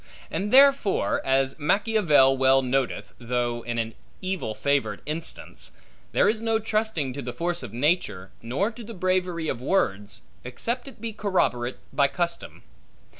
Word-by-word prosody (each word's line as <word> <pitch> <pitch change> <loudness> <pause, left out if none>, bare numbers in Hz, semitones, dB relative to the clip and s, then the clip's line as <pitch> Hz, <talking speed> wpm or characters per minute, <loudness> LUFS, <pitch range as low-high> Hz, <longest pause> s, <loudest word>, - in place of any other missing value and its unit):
And 195 +6 -2
therefore, 275 -6 +4
as 135 +2 +1
Machiavel 160 -6 +4
well 135 0 +4
noteth 130 0 -1
(though 120 0 -1
in 120 0 -4
an 115 -1 -2 0.3
evil 185 - -3
favored 110 -3 0
instance), 160 +2 -4 0.4
there - - +3
is 220 0 +1
no 225 -1 +2
trusting 215 - -1
to 140 - -5
the 125 -1 -4
force 170 +5 -2
of 125 -5 -7
nature, 120 - 0
nor 140 - -1
to 235 +1 -10
the 225 +1 -9
bravery 180 -3 0
of 115 - -3
words, 105 - -1 0.2
except 235 - -4
it 265 - -12
be 230 -1 -4
corroborate 175 - 0 0.2
by 140 -1 +4
custom. 170 +3 -3
150 Hz, 150 wpm, -25 LUFS, 125-200 Hz, 0.4 s, therefore